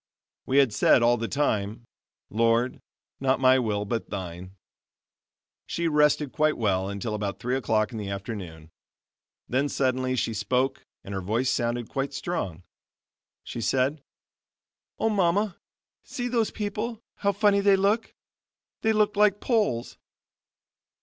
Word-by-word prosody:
We 135 - +2
had 135 -6 +5
said 120 - +4
all 120 +1 +5
the 115 0 -3
time: 110 -5 -1 0.5
"Lord, 115 +3 +1 0.4
not 135 0 +2
my 130 0 +5
will, 105 -4 -1
but 115 +2 -3
thine." 90 -1 -6 1.1
She 170 0 -1
rested 150 -2 +3
quite 155 -1 +1
well 95 -4 0
until 100 +2 -4
about 100 -3 -3
three 125 +4 -1
o'clock 110 -3 +1
in 115 - -5
the 100 -2 -4
afternoon; 95 -6 -6 0.8
then 140 +3 +1
suddenly 130 -1 0
she 115 -2 -1
spoke 125 +6 0 0.2
and 100 - -7
her 95 - -2
voice 115 +7 0
sounded 120 -1 -1
quite 140 +1 -3
strong. 130 - -3 0.8
She 120 - -6
said: 135 +5 +1 1.0
"Oh, 225 - +1
Mama 195 0 +1 0.5
see 245 -1 -4
those 235 -3 +1
people, 215 +2 -4
how 200 -1 +1
funny 200 0 +3
they 200 0 +5
look! 200 +4 +1 0.7
They 220 0 +2
look 210 -1 +2
like 205 -1 +4
poles." 210 - 0
130 Hz, 135 wpm, -26 LUFS, 105-175 Hz, 1.1 s, had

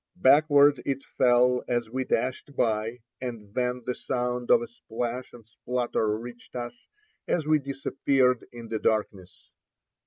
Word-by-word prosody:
Backward 145 -2 +5
it 135 -1 -2
fell 125 0 +3
as 120 -2 0
we 130 +1 -2
dashed 130 +4 -2
by, 115 +1 0 0.2
and 115 -5 -6
then 125 0 -1
the 125 - -1
sound 125 -1 -3
of 235 - +6
a - - -6
splash 125 - -5
and 115 -3 -14
splutter 115 -2 -1
reached 120 +2 -11
us 120 -1 -6 0.4
as 160 -4 0
we 155 0 +4
disappeared 135 -2 +1
in 115 -1 -10
the 110 - -2
darkness. 105 -5 -2
125 Hz, 145 wpm, -27 LUFS, 115-135 Hz, 0.4 s, of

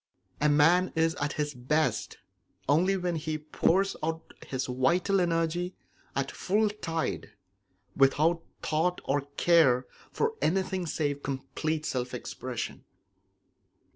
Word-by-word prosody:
A 150 - +4
man 165 +5 +4
is 160 0 +2
at 145 0 0
his 150 -1 -2
best 150 +5 0 0.5
only 180 +7 +3
when 175 -2 -1
he 155 0 -2
pours 170 +5 +1
out 160 +1 -4
his 130 -1 -2
vital 170 +10 +2
energy 175 +1 0 0.4
at 135 0 -1
full 210 +3 +1
tide, 165 -6 -3 0.6
without 155 +5 +3 0.2
thought 170 +3 +1
or 145 +1 +1 0.2
care 140 -8 +5 0.3
for 450 0 0
anything 185 +1 0
save 145 -2 -1
complete 155 +3 -3
self 125 -2 -2
expression. 125 0 -5
160 Hz, 115 wpm, -29 LUFS, 145-175 Hz, 0.6 s, care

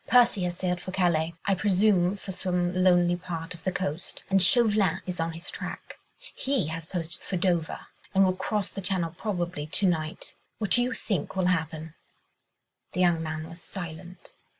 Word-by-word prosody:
Percy 240 -6 +5
has 175 0 -3
sailed 180 -1 -1
for - - -7
Calais, 170 -3 +1
I 200 - +3
presume 190 -1 +3
for 195 -1 -7
some 180 -1 0
lonely 175 -1 +4
part 170 -2 -5
of 165 -2 -13
the 185 - 0
coast, 180 -2 -4
and 195 0 +5
Chauvelin 210 +1 +5
is 180 -1 -4
on 165 0 -1
his 165 +1 -6
track. - - -7 0.3
He 265 - 0
has 165 0 -5
posted 170 -2 -4
for 185 - -3
Dover, 170 -2 0 0.3
and 195 0 +5
will 185 0 +2
cross 205 +1 -1
the 195 - -5
Channel 180 -3 -1
probably 175 -6 -3
to 195 +6 0
night. 160 -3 -1 0.2
What 210 -3 -3
do 245 - +6
you 250 +1 0
think 195 -7 -3
will 190 -1 +1
happen?" 160 -1 -3 1.0
The 180 - 0
young 175 -2 +4
man 155 0 -4
was 165 +1 -9
silent. 175 0 -8
180 Hz, 180 wpm, -27 LUFS, 165-190 Hz, 1.0 s, do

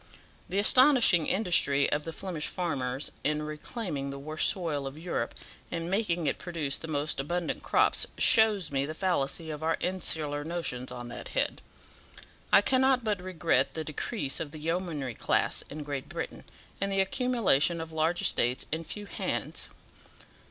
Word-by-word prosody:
The 185 - -2
astonishing 245 - +5
industry 155 -8 +4
of 150 +1 -1
the 165 - -4
Flemish 165 -2 -4
farmers 135 -6 -2
in 150 +1 0
reclaiming 150 - -4
the 140 - -6
worst 155 +3 +1
soil 155 -7 -1
of 135 +2 -8
Europe, 170 +2 -3 0.3
and 165 +1 -4
making 180 -5 0
it - - -1
produce 165 -6 -2
the 165 - -8
most 150 -2 -1
abundant 170 +4 -2
crops, - - +3
shows 215 -7 +6
me 140 0 0
the 155 - -6
fallacy 165 -3 -1
of 150 0 -6
our 165 +1 0
insular 155 -5 0
notions 150 -7 -3
on 120 -1 -7
that 120 - -7
head. - - 0 0.9
I 200 - +7
cannot 260 +2 +2
but 210 -4 -1
regret 180 -3 0
the 160 - -2
decrease 155 - -2
of 155 - -4
the 155 +1 -10
yeomanry 160 -5 -2
class - - 0
in 150 +1 -6
Great 140 -2 -5
Britain, - - -6 0.4
and 195 0 0
the 195 - 0
accumulation 190 - +2
of 160 0 -6
large 160 +2 0
estates 125 +2 +2
in 160 +2 -2
few 205 +5 -7
hands. - - -4
160 Hz, 160 wpm, -29 LUFS, 145-185 Hz, 0.9 s, I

